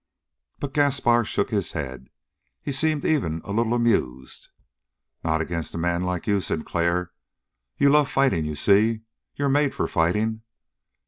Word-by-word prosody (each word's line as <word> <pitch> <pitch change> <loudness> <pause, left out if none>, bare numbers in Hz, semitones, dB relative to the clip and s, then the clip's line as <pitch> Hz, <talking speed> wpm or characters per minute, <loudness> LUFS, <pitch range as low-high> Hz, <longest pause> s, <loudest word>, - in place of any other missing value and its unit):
But 140 -1 -5
Gaspar 130 -5 +3
shook 125 - -1
his 100 -4 -1
head. 65 -4 -6 0.5
He 145 - -3
seemed 150 +1 +1
even 85 - 0
a - - -6
little 115 +3 +1
amused. 65 - -1 0.7
"Not 80 0 +1
against 85 0 -4
a - - -3
man 85 +1 0
like 90 -1 -2
you, 100 -3 +1
Sinclair. 85 +1 -1 0.7
You 140 0 +4
love 150 -1 +4
fighting, 135 - +2
you 75 0 -4
see. 110 +7 +3 0.3
You're 145 - -1
made 145 0 +2
for - - -1
fighting. 105 +6 0
105 Hz, 145 wpm, -24 LUFS, 85-135 Hz, 0.7 s, You